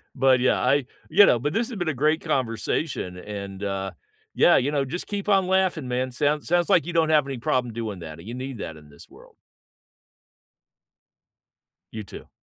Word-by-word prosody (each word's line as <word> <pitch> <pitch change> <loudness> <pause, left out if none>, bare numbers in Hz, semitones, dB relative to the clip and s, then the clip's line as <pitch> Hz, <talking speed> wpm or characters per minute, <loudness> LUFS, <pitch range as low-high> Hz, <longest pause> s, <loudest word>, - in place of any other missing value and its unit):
But, 130 -1 +4
yeah, 130 - +2
I, 135 +1 +2 0.2
you 205 +1 +7
know, 120 - +3
but, 145 +5 -2
this 230 +3 0
has 225 - -6
been 175 -3 -2
a - - 0
great 155 +5 +1
conversation 125 - -2
and, 100 0 -7
uh, 95 -1 -3 0.4
yeah, - - +6
you 140 +3 +1
know, 140 -2 0
just 175 +7 -5
keep 205 0 -4
on 195 -2 +3
laughing, 185 -7 +1
man. 125 +1 -1
Sounds 145 +4 0
sounds, 175 0 +2
like, - - +4
you 175 - -5
don't 160 -1 +2
have 150 -3 +3
any 135 -2 -4
problem 125 0 -1
doing 110 -5 -5
that, 80 -1 -9
and 90 - -12
you 120 - -6
need 130 -1 -6
that 80 -1 -6
in 75 -1 -16
this 70 - -16
world. - - -18 2.6
You 110 -1 -6
too. - - -12
130 Hz, 200 wpm, -24 LUFS, 110-160 Hz, 2.6 s, you